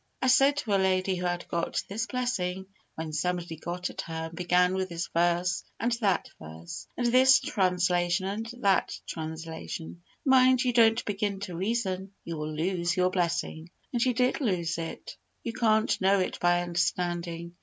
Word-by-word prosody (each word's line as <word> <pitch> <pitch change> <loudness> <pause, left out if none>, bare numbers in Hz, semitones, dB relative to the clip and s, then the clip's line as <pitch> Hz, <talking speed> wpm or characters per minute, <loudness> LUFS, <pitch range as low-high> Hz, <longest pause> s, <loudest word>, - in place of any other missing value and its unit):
I - - -1
said 275 +3 +5
to 235 -7 -3
a 195 - +3
lady 185 0 +1
who 180 0 -1
had 175 0 -3
got 170 0 -1
this 225 +3 -3
blessing 190 -6 -2 0.3
when 160 -1 -5
somebody 175 +1 -2
got 175 +3 -4
at - - -5
her 160 0 -5
and 165 - -12
began 180 +1 +3
with 190 0 -1
this 170 0 -3
verse 175 +2 +1 0.2
and 235 - 0
that 195 -5 +1
verse, 80 +2 -9
and 245 - 0
this 260 +2 +6
translation 180 -2 +1
and 210 +4 -3
that 195 -1 +2
translation 160 +1 -6 0.2
"Mind 260 -1 +5
you 250 -1 +1
don't 225 -1 +4
begin 200 -1 -2
to 185 -4 -5
reason; 195 -1 -2
you 170 - -5
will 155 0 -4
lose 170 +2 -1
your 180 0 +3
blessing" 170 -2 -1 0.2
and 240 - 0
she 250 0 +3
did 250 +4 +1
lose 175 -8 0
it. 165 0 -6 0.3
You 230 - -3
can't 220 -3 +2
know 195 +1 +4
it 185 - -2
by 175 0 +3
understanding. 175 -1 -2
180 Hz, 175 wpm, -28 LUFS, 170-215 Hz, 0.3 s, this